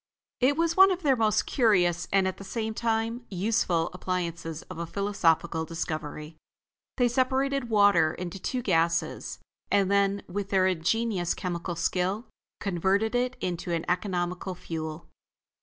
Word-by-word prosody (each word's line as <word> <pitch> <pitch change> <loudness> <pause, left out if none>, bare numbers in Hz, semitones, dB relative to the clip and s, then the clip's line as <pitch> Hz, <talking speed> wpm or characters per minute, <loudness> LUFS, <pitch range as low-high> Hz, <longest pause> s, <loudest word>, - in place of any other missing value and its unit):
It 275 +3 +3
was 335 0 +1
one 385 +1 +8
of 365 -1 -2
their 275 -3 +4
most 220 -3 +2
curious 180 -8 +2
and, 195 -1 +3
at 190 - -3
the - - -9
same 220 +2 -3
time, 230 +1 -1
useful 185 -4 0
appliances 170 -3 -3
of 185 -2 -9
a 170 - -3
philosophical 170 -4 +1
discovery. 155 -1 -5 0.6
They 245 -2 +4
separated 260 +1 0
water 200 -7 +5
into 180 +1 -6
its - - -3
two 250 -2 -2
gases, 170 -3 0 0.3
and 200 -1 +2
then, 200 0 +2
with 200 +2 -4
their 190 -2 +3
ingenious 185 +1 0
chemical 175 -1 -3
skill, 180 +6 -1 0.3
converted 195 +4 +1
it 250 +1 0
into 175 -1 -3
an 165 -1 -1
economical 180 0 -2
fuel. 160 -1 -6
190 Hz, 145 wpm, -27 LUFS, 170-225 Hz, 0.6 s, one